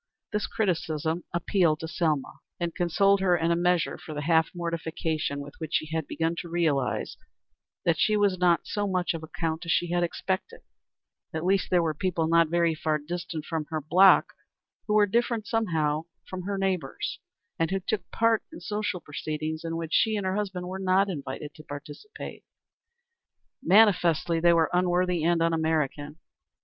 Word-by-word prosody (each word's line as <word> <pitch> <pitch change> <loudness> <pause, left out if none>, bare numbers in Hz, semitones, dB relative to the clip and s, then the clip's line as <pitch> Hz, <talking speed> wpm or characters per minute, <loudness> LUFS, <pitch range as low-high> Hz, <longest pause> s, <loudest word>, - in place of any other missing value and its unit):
This 210 - -1
criticism 165 -5 -1
appealed 170 -2 +1
to 160 - -4
Selma, 155 -4 -1 0.2
and 170 -1 -2
consoled 195 +3 +3
her 180 -2 +3
in 165 0 +1
a - - +3
measure 175 -1 +1
for 165 -4 -8
the 150 - -3
half 160 0 +3
mortification 160 -3 -2
with 145 0 -9
which 160 -1 -3
she 155 +1 -1
had 160 -3 -2
begun 165 +1 -1
to 170 - -5
realize 155 -7 0 0.7
that 165 -2 +2
she 215 +4 +3
was 200 -3 +2
not 175 -2 +4
of - - -42
so 205 -1 -2
much 180 -2 0
account 160 +1 -4
as 170 - -2
she 175 0 +1
had 175 0 +1
expected; 185 +2 -3 0.7
at 160 +2 -2
least, 195 +1 +2
that - - +1
there 175 - +4
were 160 -2 0
people 165 +1 -1
not 165 0 +4
very 170 -1 +2
far 155 -1 0
distant 165 0 -5
from 160 -2 -3
her 155 0 -3
block 180 +6 +5 0.5
who 210 - +1
were 210 -1 +6
different 230 +1 0
somehow 160 -9 0 0.2
from 185 -1 -6
her 200 -1 -1
neighbors, 190 -2 -2 0.4
and 165 -1 +1
who 195 - 0
took 195 -2 -3
part 230 -1 +2
in 325 - -9
social 210 -4 -3
proceedings 155 +2 -4
in 165 0 -3
which 165 -1 -5
she 220 -1 +3
and 205 -2 -2
her 185 - 0
husband 190 -3 -3
were 190 +1 -5
not 190 +1 +2
invited 145 -1 -6
to 155 - -13
participate. 150 - -9 1.2
Manifestly 175 -4 +4
they 170 +1 +5
were 165 -2 +3
unworthy 180 -1 +2
and 170 0 +3
un 165 0 +2
American. 155 -2 -1
170 Hz, 180 wpm, -27 LUFS, 160-190 Hz, 1.2 s, were